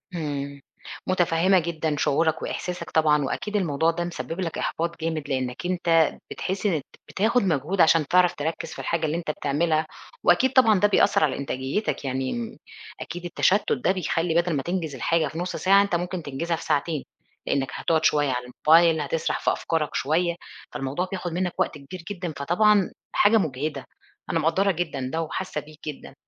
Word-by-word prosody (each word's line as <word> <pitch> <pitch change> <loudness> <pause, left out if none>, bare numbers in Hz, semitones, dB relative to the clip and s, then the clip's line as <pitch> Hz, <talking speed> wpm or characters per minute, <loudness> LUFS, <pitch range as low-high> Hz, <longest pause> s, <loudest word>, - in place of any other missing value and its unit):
إمم، 140 -3 -4 0.5
مُتفهمة 185 +1 +3
جدًا 160 -2 -2
شعورك 160 +2 +1
وإحساسك 180 -1 -4
طبعًا، 150 -2 +3
وأكيد 210 +9 -3
الموضوع 165 -4 +2
ده 170 +1 -3
مسبب 175 0 -5
لك 165 -3 -3
إحباط 170 +1 -2
جامد 160 -3 -3
لأنك 130 +3 -2
أنت 170 -3 +2
بتحس 190 +2 -3
إن 165 -8 +2
ت - - -24 0.3
بتاخد 230 +5 +2
مجهود 170 +2 +1
عشان 160 -2 +4
تعرف 180 +2 +4
تركّز 160 +3 -3
في - - -10
الحاجة 165 -1 -1
اللي 155 +2 -1
أنت 160 -3 -2
بتعملها 155 +2 0 0.4
وأكيد 260 0 +4
طبعًا 225 -7 +5
ده 205 - +5
بيأثر 205 -4 +3
على 140 -4 +1
إنتاجيتك، 140 +5 -2
يعني 135 - -3 0.4
أكيد 175 +1 -6
التشتت 185 +3 +2
ده 235 - +1
بيخلّي 170 -2 -1
بدل 175 -1 -2
ما 135 - -1
تنجز 170 -5 -3
الحاجة 160 +5 +1
في 160 - -8
نُص 180 +1 -3
ساعة 195 +1 +5
أنت 200 -3 0
ممكن 175 0 -3
تنجزها 165 +5 -2
في - - -8
ساعتين، 150 0 0 0.4
لأنك 135 -2 0
هتقعد 160 -1 0
شويّة 145 -2 +3
على 125 0 -2
الموبايل 160 +5 +4
هتسرح 155 +2 -1
في - - +2
أفكارك 160 -3 -2
شويّة، 170 +4 +1 0.4
فالموضوع 140 +7 -3
بياخد 180 -2 -3
منّك 180 0 -1
وقت - - 0
كبير 165 +5 -10
جدًا، 180 -5 -4
فطبعًا 195 +7 +3 0.2
حاجة 220 +2 +5
مُجهدة. 145 -5 -2 0.4
أنا - - +1
مقدّرة 190 +5 +2
جدًا 155 -7 -3
ده 165 - 0
وحاسّة 165 -1 -4
بيك 155 0 -16
جدًا. 145 -2 -7
165 Hz, 175 wpm, -25 LUFS, 150-180 Hz, 0.5 s, طبعًا